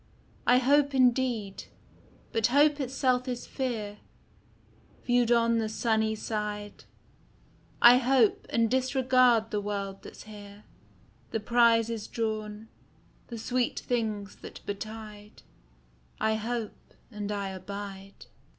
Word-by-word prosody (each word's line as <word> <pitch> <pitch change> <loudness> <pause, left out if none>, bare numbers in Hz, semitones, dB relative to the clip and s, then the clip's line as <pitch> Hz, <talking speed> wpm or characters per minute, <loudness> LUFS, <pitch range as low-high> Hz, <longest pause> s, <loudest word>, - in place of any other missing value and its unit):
I 245 - +6
hope 280 +2 +3
indeed; 245 -5 +1 0.7
but 225 -1 +2
hope 290 +3 +4
itself 255 -1 0
is 245 -1 -4
fear 220 -6 -4 1.1
Viewed 245 -1 +2
on 230 -1 +3
the 220 -1 -1
sunny 220 -1 0
side; 210 -1 -5 1.0
I 240 +1 +10
hope, 255 -3 +2
and 230 -1 +2
disregard 255 -2 +3
the 210 -2 -1
world 200 -1 -4
that's - - -11
here, 205 -1 -12 0.7
The 225 - -2
prizes 230 -1 +2
drawn, 215 -1 -4 0.6
the 235 - -7
sweet 245 +2 -1
things 215 -4 -3
that - - -11
betide: 210 0 -8 0.8
I 220 - +1
hope, 220 0 -5 0.2
and 210 -1 -5
I 200 -1 -3
abide. 195 +1 -8
225 Hz, 110 wpm, -28 LUFS, 210-245 Hz, 1.1 s, I